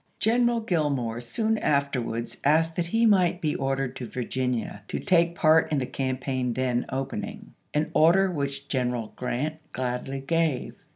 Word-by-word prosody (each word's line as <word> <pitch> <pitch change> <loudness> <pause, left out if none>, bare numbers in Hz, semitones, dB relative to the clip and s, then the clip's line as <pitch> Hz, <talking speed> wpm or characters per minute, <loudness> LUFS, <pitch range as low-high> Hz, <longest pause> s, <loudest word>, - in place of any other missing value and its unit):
General 235 +1 +2
Grill 170 -9 +1
more 120 -4 -2
soon 220 - -1
afterwards 120 -5 -1
asked 160 +3 +3
that 170 -1 -1
he 225 +6 +2
might 185 -5 +4
be 155 -4 0
ordered 135 -1 -1
to 125 - -5
Virginia 125 -4 -2
to - - -3
take 170 -2 +3
part 160 -1 +4
in 150 - +2
the 130 - 0
campaign 130 -2 -2
then 125 -2 0
opening; 135 +1 -5 0.2
an 150 +1 0
order 180 +5 +5
which 140 -3 -3
Greneral 125 -4 -1
G 125 - -5
rant 150 +6 -1 0.2
gladly 130 +2 -3
gave. 160 -2 0
140 Hz, 160 wpm, -26 LUFS, 125-165 Hz, 0.2 s, order